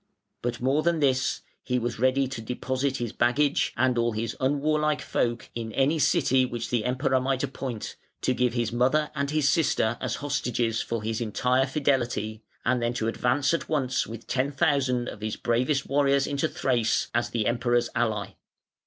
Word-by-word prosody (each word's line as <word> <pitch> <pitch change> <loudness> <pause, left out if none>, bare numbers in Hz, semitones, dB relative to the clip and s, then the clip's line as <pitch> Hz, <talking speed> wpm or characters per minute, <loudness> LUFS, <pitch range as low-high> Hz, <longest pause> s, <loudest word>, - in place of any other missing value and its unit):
But 120 0 -2
more 135 +4 +2
than 170 0 +1
this, 130 -3 +1 0.2
he 125 - -1
was 120 -2 -3
ready 130 +2 +2
to 125 -3 -6
deposit 130 +3 -2
his 120 -3 -4
baggage 140 +4 +2
and 130 -2 +2
all 115 -1 +1
his 110 +1 -3
unwarlike 150 +3 +1
folk 120 0 -1
in 115 -1 -5
any 145 +4 +2
city 130 -2 +3
which 120 -2 -4
the 120 -3 0
Emperor 130 +1 +1
might 130 0 0
appoint, 125 -5 -5 0.2
to 130 - +1
give 125 -1 +1
his 120 -2 0
mother 130 +6 +2
and 140 -1 -1
his 150 -1 +1
sister 120 -8 +2
as 120 -2 -1
hostages 120 -5 -1
for 115 -2 -3
his 110 +1 -2
entire 125 +4 +1
fidelity, 125 -6 0 0.2
and 125 0 +2
then 120 +1 -1
to 110 - -1
advance 130 +6 +1
at 165 - -2
once 135 -5 0
with 115 0 -8
ten 135 +2 0
thousand 130 -3 +1
of 105 - -7
his 110 0 -2
bravest 125 +4 0
warriors 140 0 +2
into 140 -1 0
Thrace, 120 -4 0
as 120 0 0
the 115 -2 -1
Emperor's 120 0 +1
ally. 110 -4 0
125 Hz, 180 wpm, -26 LUFS, 120-140 Hz, 0.2 s, city